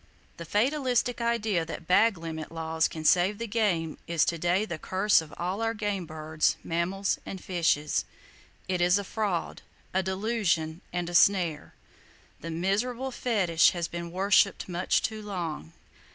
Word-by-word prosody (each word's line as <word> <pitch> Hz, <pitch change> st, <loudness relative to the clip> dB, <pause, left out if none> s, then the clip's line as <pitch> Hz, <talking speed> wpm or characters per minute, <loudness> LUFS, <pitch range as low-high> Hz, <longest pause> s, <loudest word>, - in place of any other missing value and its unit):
The 170 Hz, -, -7 dB
fatalistic 245 Hz, -, +1 dB
idea 220 Hz, -6 st, +1 dB
that 165 Hz, +1 st, -7 dB
bag 200 Hz, +4 st, +4 dB
limit 160 Hz, -1 st, -6 dB
laws 160 Hz, 0 st, 0 dB
can 155 Hz, -1 st, -7 dB
save 185 Hz, +5 st, +4 dB
the 230 Hz, -, -4 dB
game 200 Hz, -8 st, 0 dB
is 170 Hz, -2 st, +2 dB
to 170 Hz, -, -1 dB
day 180 Hz, +5 st, +1 dB
the 170 Hz, -6 st, -5 dB
curse 190 Hz, +2 st, +3 dB
of 155 Hz, -2 st, -11 dB
all 185 Hz, +5 st, -2 dB
our 225 Hz, 0 st, 0 dB
game 205 Hz, -5 st, -2 dB
birds, 155 Hz, 0 st, 0 dB
mammals 185 Hz, +4 st, -1 dB
and 190 Hz, -, -7 dB
fishes! 165 Hz, -5 st, 0 dB, 0.6 s
It 180 Hz, -1 st, -1 dB
is 180 Hz, +2 st, +4 dB
a 200 Hz, -, -2 dB
fraud, 200 Hz, -4 st, -2 dB, 0.3 s
a 190 Hz, -, +2 dB
delusion 190 Hz, -4 st, -1 dB
and 175 Hz, -1 st, -2 dB
a 175 Hz, -, -6 dB
snare. 175 Hz, -4 st, +3 dB, 0.6 s
That 165 Hz, -, -7 dB
miserable 215 Hz, +10 st, -1 dB
fetish 190 Hz, -10 st, +3 dB
has 170 Hz, -2 st, -2 dB
been 170 Hz, 0 st, -6 dB
worshipped 195 Hz, +2 st, +2 dB
much 180 Hz, 0 st, 0 dB
too 220 Hz, -2 st, -3 dB
long. 170 Hz, -, -5 dB
180 Hz, 155 wpm, -28 LUFS, 165-210 Hz, 0.6 s, bag